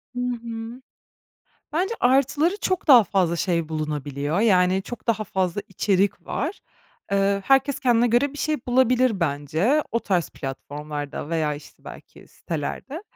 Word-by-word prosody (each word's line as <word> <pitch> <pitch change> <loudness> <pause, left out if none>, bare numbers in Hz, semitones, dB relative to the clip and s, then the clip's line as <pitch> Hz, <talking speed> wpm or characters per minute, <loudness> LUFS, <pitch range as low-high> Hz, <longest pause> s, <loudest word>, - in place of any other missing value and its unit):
Hı 245 - -2
hı. 235 0 -5 0.9
Bence 370 +8 0
artıları, 280 +8 +3
çok 370 -2 -1
daha 245 -6 +9
fazla 175 -3 +1
şey 170 -3 0
bulunabiliyor, 150 +1 -2
yani 190 -3 +3
çok 240 +3 -9
daha 220 -2 +1
fazla 185 0 -1
içerik 195 +1 0
var. 310 - -3 0.5
Eee, 200 0 +2
herkes 270 0 +3
kendine 245 -2 +3
göre 240 +4 +2
bir 290 - -10
şey 305 +1 0
bulabilir 250 -4 +3
bence 160 - +1
o 230 - +1
tarz 180 -7 0
platformlarda 145 +2 -6
veya, 155 -3 0
işte, 145 - -14
belki - - -13
sitelerde. 260 - -5
205 Hz, 135 wpm, -24 LUFS, 165-255 Hz, 0.9 s, daha